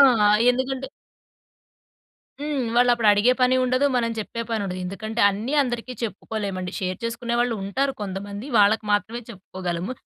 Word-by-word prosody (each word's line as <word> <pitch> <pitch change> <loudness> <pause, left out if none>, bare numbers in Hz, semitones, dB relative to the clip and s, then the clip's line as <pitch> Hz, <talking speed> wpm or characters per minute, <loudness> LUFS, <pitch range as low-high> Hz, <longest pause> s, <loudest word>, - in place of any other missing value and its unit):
ఆ! - - +10 0.5
ఎందుకంటే 260 +1 -2 1.6
హ్మ్. 290 -4 -1
వాళ్ళప్పుడడిగే 240 -2 +4
పనీ 255 +1 +4
ఉండదు. 255 +2 +2
మనం 230 -1 +1
చెప్పే 230 +2 -4
పనుండదు. 200 -5 -2
ఎందుకంటే, 220 +5 -3
అన్నీ 215 +8 -3
అందరికీ 245 -1 -3
చెప్పుకోలేమండి. 200 -3 -4
షేర్ 185 -1 -2
చేసుకునే 235 +1 -2
వాళ్ళుంటారు 240 +3 0
కొంతమంది, 200 +3 -5
వాళ్ళకి 210 +2 +4
మాత్రమే 210 +4 0
చెప్పుకోగలము. 185 -1 -5
225 Hz, 120 wpm, -24 LUFS, 200-245 Hz, 1.6 s, ఆ